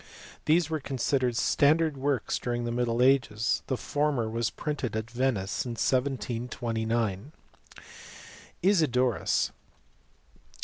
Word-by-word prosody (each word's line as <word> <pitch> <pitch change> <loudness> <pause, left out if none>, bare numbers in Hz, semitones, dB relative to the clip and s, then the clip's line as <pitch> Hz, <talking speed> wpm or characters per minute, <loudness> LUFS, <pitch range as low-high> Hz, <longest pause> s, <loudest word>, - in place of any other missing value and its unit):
These 160 +1 +3
were 160 -1 -2
considered 130 -2 0
standard 155 +3 +3
works 135 -3 -1
during 120 -1 -2
the 120 - -2
middle 120 0 +1
ages: 125 -4 +2
the 130 - -1
former 145 -6 0
was 115 0 -1
printed 145 -7 -4
at 110 +1 -4
Venice 120 -6 -1
in 120 - -4
1729. 115 -3 -1 1.3
Isidorus. 130 - +2
125 Hz, 100 wpm, -28 LUFS, 115-140 Hz, 1.3 s, These